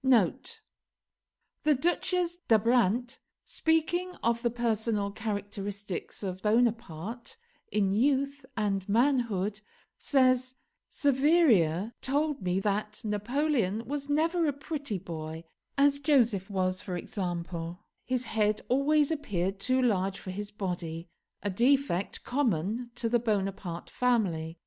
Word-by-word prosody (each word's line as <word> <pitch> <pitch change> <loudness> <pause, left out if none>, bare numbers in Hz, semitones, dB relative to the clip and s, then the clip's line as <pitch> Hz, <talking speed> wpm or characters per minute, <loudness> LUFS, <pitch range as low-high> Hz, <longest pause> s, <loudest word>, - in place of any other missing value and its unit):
[The 270 - -2
Duchesse 350 +1 +1
d'Abrantes, 235 +2 +3 0.3
speaking 345 +3 0
of 235 0 +2
the 235 - +2
personal 220 -3 0
characteristics 205 -2 -5
of 185 -1 -4
Bonaparte 230 - -1 0.3
in 200 -2 +2
youth 275 +5 +1
and 200 -3 -1
manhood, 220 -4 +1 0.4
says, 255 -2 +2 0.3
"Saveria 255 - +3
told 290 +1 0
me 185 0 0
that 210 +1 -2
Napoleon 225 0 0
was 285 +1 -4
never 325 +3 +2
a 290 - +1
pretty 280 -5 -4
boy, 160 -2 -6 0.3
as 280 0 +4
Joseph 235 - +2
was, 185 -2 0
for 180 -3 -4
example: 175 -1 -4 0.2
his 255 0 -1
head 215 -2 0
always 290 +4 +3
appeared 195 - -2
too 255 +5 +2
large 195 -4 +1
for 185 - -7
his 205 +2 -5
body, 175 -5 -4 0.3
a 205 - 0
defect 240 -3 +1
common 235 - 0
to 235 -1 -1
the 240 +1 +2
Bonaparte 195 -6 -2
family. 180 -10 0
225 Hz, 110 wpm, -29 LUFS, 195-275 Hz, 0.4 s, as